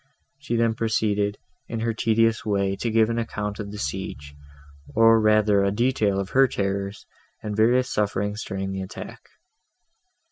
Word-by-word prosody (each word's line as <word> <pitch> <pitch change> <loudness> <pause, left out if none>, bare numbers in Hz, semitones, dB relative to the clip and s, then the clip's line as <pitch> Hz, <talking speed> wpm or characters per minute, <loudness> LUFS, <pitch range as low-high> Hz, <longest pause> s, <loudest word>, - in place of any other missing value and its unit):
She 140 -5 -3
then 115 -1 +2
proceeded, 105 -2 0 0.3
in 115 -1 -4
her 115 0 0
tedious 115 0 +2
way, 100 -2 0
to 120 - -2
give 110 0 +3
an 115 - -1
account 105 -3 -4
of 105 -1 -5
the 105 - -8
siege, 70 -2 -5 0.6
or 115 0 +6
rather 105 -2 +4
a 100 - +2
detail 105 -2 +1
of 95 0 -4
her 135 0 +5
terrors 100 -2 -3 0.4
and 105 -1 -4
various 120 +4 +2
sufferings, 105 +1 -1
during 95 -1 -4
the 95 0 -4
attack. 95 - -8
105 Hz, 155 wpm, -24 LUFS, 100-115 Hz, 0.6 s, or